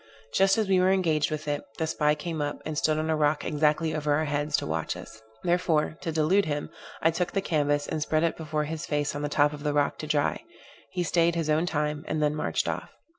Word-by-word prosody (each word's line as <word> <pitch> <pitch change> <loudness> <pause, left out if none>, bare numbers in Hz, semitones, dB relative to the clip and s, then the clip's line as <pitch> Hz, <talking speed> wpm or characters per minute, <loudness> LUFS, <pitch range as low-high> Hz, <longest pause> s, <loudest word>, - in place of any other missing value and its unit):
Just 195 +1 +4
as 220 -2 +1
we 190 -1 +4
were 185 +1 +4
engaged 165 -6 +2
with 155 0 -4
it, 145 0 -1
the 160 - 0
spy 150 -1 +1
came 160 0 -4
up, 145 0 -2
and 155 - -3
stood 155 +1 +2
on 155 +1 0
a - - +2
rock 150 0 +1
exactly 155 +1 +1
over 150 -1 0
our 155 +1 +1
heads, 145 0 0
to - - -3
watch 80 +1 -2
us. 110 0 -11 0.2
Therefore, 170 -3 +1
to 165 - -2
delude 160 +6 +3
him, 145 -1 -3 0.3
I 165 - +5
took 175 +2 -2
the 195 - +2
canvas 145 -5 +1
and 155 - -2
spread 155 +1 +1
it 165 - +1
before 155 -1 -2
his 155 +2 -5
face 145 -1 -1
on 145 - -3
the 145 - -2
top 145 0 +3
of 145 - -8
the 145 0 -1
rock 145 -1 +1
to 155 - -5
dry; 150 - 0 0.5
he 180 - -2
staid 170 0 +2
his 160 -2 0
own 160 +3 +2
time, 150 -2 -1
and 155 - -1
then 150 -1 +2
marched 150 - -1
off. - - -3
155 Hz, 245 wpm, -27 LUFS, 150-165 Hz, 0.5 s, I